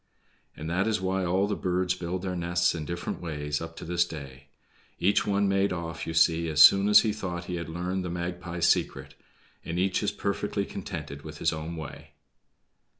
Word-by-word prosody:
And 75 - -6
that 90 +5 0
is 110 -3 +1
why 95 0 -1
all 95 +3 +2
the 105 0 -1
birds 90 -1 0
build 90 0 -4
their 95 -1 -2
nests 85 0 +1
in 80 -3 -4
different 85 +1 -4
ways 75 -3 -3
up 80 0 -7
to - - -8
this 85 +1 +2
day. 70 -4 -9 0.5
Each 100 +4 +2
one 100 0 +2
made 100 0 +2
off, 80 -2 -4
you 80 - -3
see, 80 0 +3
as 75 -1 -1
soon 100 +6 +8
as 105 - +9
he 110 -2 0
thought 90 -4 -5
he 90 - -3
had 85 -1 -5
learned 90 +3 -2
the 90 - -4
Magpie's 85 0 -2
secret, - - 0 0.5
and 85 - -4
each 95 +1 +1
is - - +1
perfectly - - -2
contented 70 +1 -6
with - - -9
his - - +1
own 80 +2 -5
way. 80 -3 -9
85 Hz, 200 wpm, -28 LUFS, 80-95 Hz, 0.5 s, as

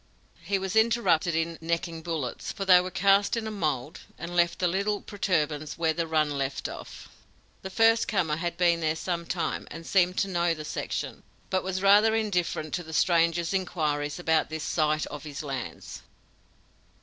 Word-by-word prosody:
He 200 - 0
was 190 +1 -4
interrupted 220 -8 +3
in 165 0 -1
'necking' 165 0 -2
bullets, 160 -7 -4
for 195 - -5
they 180 -1 +7
were 180 - -4
cast 195 +3 +3
in 225 - -3
a 220 - -3
mold 155 -7 -2 0.2
and 175 +1 -6
left 170 +1 +2
a - - +5
little 200 +3 0
protuberance 155 -8 -2
where 165 -1 +1
the 165 0 -2
run 150 -3 +1
left 135 0 -2
off. - - -9 0.5
"This 190 0 -7
first 225 0 +4
comer 165 -8 0
had 170 0 -3
been 170 -2 +3
there 160 -1 0
some 170 0 -3
time 175 - -2
and 165 - -9
seemed 180 0 +2
to 200 - +1
know 175 -2 +1
the 155 -1 -7
section, - - -4 0.3
but 185 - +2
was 185 0 -3
rather 210 +3 +6
indifferent 180 -8 -1
to 175 - -2
the 160 0 -10
stranger's 170 +1 +2
inquiries 150 -6 -1
about 160 -3 +1
the 160 - -4
site 155 0 0
of 145 -1 -8
his 150 -1 -6
lands. 135 -4 -6
170 Hz, 180 wpm, -27 LUFS, 155-190 Hz, 0.5 s, they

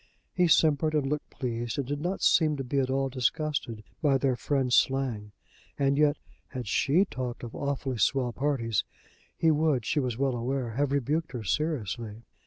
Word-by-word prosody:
He 180 -1 +3
simpered 155 -1 +3
and 150 -2 +1
looked 150 +1 -3
pleased 120 -1 -4
and 140 - -1
did 145 +1 -3
not 180 +4 -2
seem 155 -3 +4
to 135 - -3
be 135 +2 -1
at 130 -1 0
all 135 +1 +1
disgusted 130 -3 -2 0.2
by 145 -4 +3
their 135 -2 +1
friend's 130 0 0
slang, 125 -7 +1 0.5
and 140 0 +2
yet 150 0 +3 0.3
had 125 -4 -6
she 150 - +3
talked 125 -8 -5
of 120 - -7
"awfully 135 -3 -3
swell" 125 -1 +1
parties, 125 -7 0 0.5
he 160 - +4
would, 150 -6 +1
she 150 - +1
was 125 -4 -2
well 135 -1 +1
aware, 125 0 -2
have 140 +4 0
rebuked 140 +3 -1
her 120 -3 -4
seriously. 115 - -2
135 Hz, 180 wpm, -28 LUFS, 120-150 Hz, 0.5 s, seem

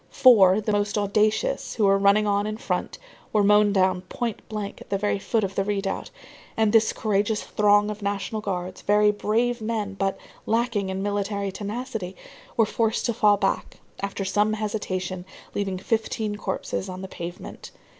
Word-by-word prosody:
Four, 205 -6 +6
the 215 0 -1
most 205 0 0
audacious, 215 - +1
who 220 - 0
were 195 0 +4
running 200 +2 +4
on 205 0 +1
in 215 0 -3
front, - - -3 0.3
were 210 -1 +3
mown 210 0 +5
down 185 -2 +2
point 230 +4 -4
blank 210 -2 -5
at - - -13
the 195 - +1
very 205 0 0
foot 220 +2 0
of 195 0 -2
the 195 - 0
redoubt, 195 -1 -2 0.5
and 220 -1 +2
this 225 -1 +5
courageous 210 0 0
throng 205 0 +3
of 210 0 -8
National 200 +2 -2
Guards, 185 -2 -4
very 210 0 +4
brave 230 +3 0
men 215 -2 -2
but 195 0 -1 0.3
lacking 225 -3 0
in 190 +1 -3
military 200 -1 -1
tenacity, 205 -1 -5 0.4
were 225 - +5
forced 225 +1 0
to 235 - +1
fall 210 -2 +4
back, 195 -1 -1 0.2
after 200 0 -3
some 210 +3 +2
hesitation, 185 -4 -3 0.3
leaving 195 -2 -2
fifteen 220 +1 -1
corpses 190 -1 -3
on 185 +1 -7
the - - -5
pavement. 175 -1 -8
205 Hz, 170 wpm, -25 LUFS, 195-215 Hz, 0.5 s, Four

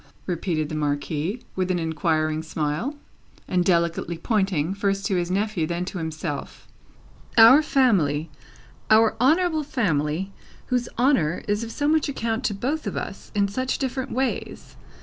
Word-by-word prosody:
repeated 170 -3 -1
the 155 - -7
Marquis, 155 - -2
with 185 -1 -1
an 185 - +1
inquiring 160 -1 0
smile, 160 - -2 0.5
and 180 -1 +1
delicately 170 -1 +1
pointing, 190 -4 0
first 195 0 -1
to 195 - +1
his 175 -1 -1
nephew, 195 -3 0
then 175 +1 -2
to 185 0 -5
himself. 160 -2 -5 0.7
"Our 230 +6 +9
family; 170 - +2 0.6
our 220 0 +5
honourable 320 +4 +3
family, 190 - -1 0.3
whose 250 -2 -1
honour 225 - +2
is 205 +2 0
of 230 - -6
so 290 +4 -1
much 310 -1 +2
account 230 -3 -2
to 205 - 0
both 280 +10 -2
of - - -3
us, - - -6
in 200 -1 +3
such 255 +6 -2
different 265 0 -3
ways. 260 +1 -3
195 Hz, 150 wpm, -24 LUFS, 160-245 Hz, 0.7 s, Our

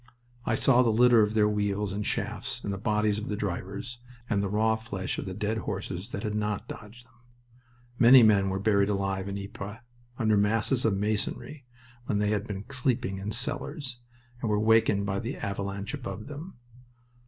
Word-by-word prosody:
I 115 - +2
saw 125 +1 +4
the 120 - +3
litter 120 +1 +6
of 105 +1 +1
their 105 -1 +5
wheels 105 -1 -1
and 105 +1 -2
shafts, - - -3
and 100 - -2
the 95 - -5
bodies 105 0 +1
of 105 - -6
the 105 - -2
drivers, 100 +4 -4 0.3
and 100 -4 +1
the 100 - -1
raw 110 +2 +2
flesh 100 -4 -4
of - - -4
the 95 - -4
dead 105 +2 -1
horses 95 0 -4
that 100 - -5
had 105 - -2
not 105 -1 -2
dodged 115 +3 -10
them. 120 - -28 0.9
Many 125 0 +9
men 100 -3 +5
were 95 - -1
buried 100 -1 +3
alive 95 -1 -1
in 100 - -3
Ypres, 100 +1 -7 0.4
under 110 -3 +3
masses 115 +4 +2
of 105 -3 +2
masonry 120 +6 -3 0.4
when 105 - +1
they 105 0 +1
had 105 +1 -1
been 100 -1 -5
sleeping 120 -7 -1
in 100 +2 -4
cellars, 135 +1 -3 0.4
and 115 - -1
were 105 0 +2
wakened 110 -2 +4
by 100 0 -1
the 120 +5 -4
avalanche 100 +2 -4
above 110 -7 -5
them. 150 +6 -8
105 Hz, 190 wpm, -28 LUFS, 100-115 Hz, 0.9 s, Many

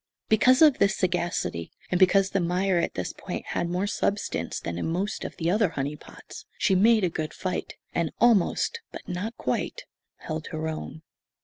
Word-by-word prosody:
Because 255 +6 +5
of 300 -4 +6
this 200 -1 +3
sagacity, 175 - -1 0.2
and 180 - +2
because 195 +1 +4
the 195 - +1
mire 180 +1 +1
at 170 - -1
this 90 - -3
point - - -6
had 170 - -1
more 180 +3 0
substance 205 0 -1
than 85 0 -4
in - - -2
most 185 +6 -2
of - - -6
the 165 +1 0
other 210 -1 +3
"honey 145 0 -3
pots," - - -12
she 205 - +2
made 215 +3 +5
a - - +4
good 155 -1 -4
fight, 185 -1 -3 0.2
and 170 -3 0
almost, 235 - +3
but - - -9
not 190 +6 -4
quite, - - -2 0.4
held 155 -1 -5
her 160 0 -3
own. 160 0 -6
180 Hz, 185 wpm, -26 LUFS, 165-205 Hz, 0.4 s, of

